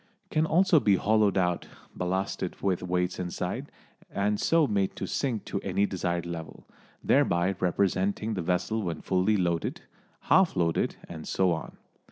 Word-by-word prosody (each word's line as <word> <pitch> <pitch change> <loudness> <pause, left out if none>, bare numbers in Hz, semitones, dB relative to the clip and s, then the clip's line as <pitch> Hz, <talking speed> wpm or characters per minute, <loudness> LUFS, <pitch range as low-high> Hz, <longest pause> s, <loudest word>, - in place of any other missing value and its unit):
It - - -41
can 155 +1 +2
also 175 0 +4
be 100 -7 +4
hollowed 105 0 +2
out, 90 -2 0 0.3
ballasted 95 0 -2
with 95 -3 0
weights 90 0 -1
inside, 90 -1 -4 0.4
and 105 +1 0
so 165 -2 +3
made 100 -5 0
to - - -4
sink 125 -7 -2
to 100 - -3
any 100 +1 +1
desired 85 -3 -2
level, 85 -2 -7 0.4
thereby 85 +3 +3
representing 100 +4 0
the 95 - -2
vessel 90 +6 0
when 85 -5 -3
fully 95 +3 +2
loaded, 85 -3 -1 0.4
half 190 -2 +4
loaded 85 -3 +1
and 80 -2 -8
so 95 -2 +2
on. 80 -1 -4
95 Hz, 155 wpm, -28 LUFS, 90-105 Hz, 0.4 s, also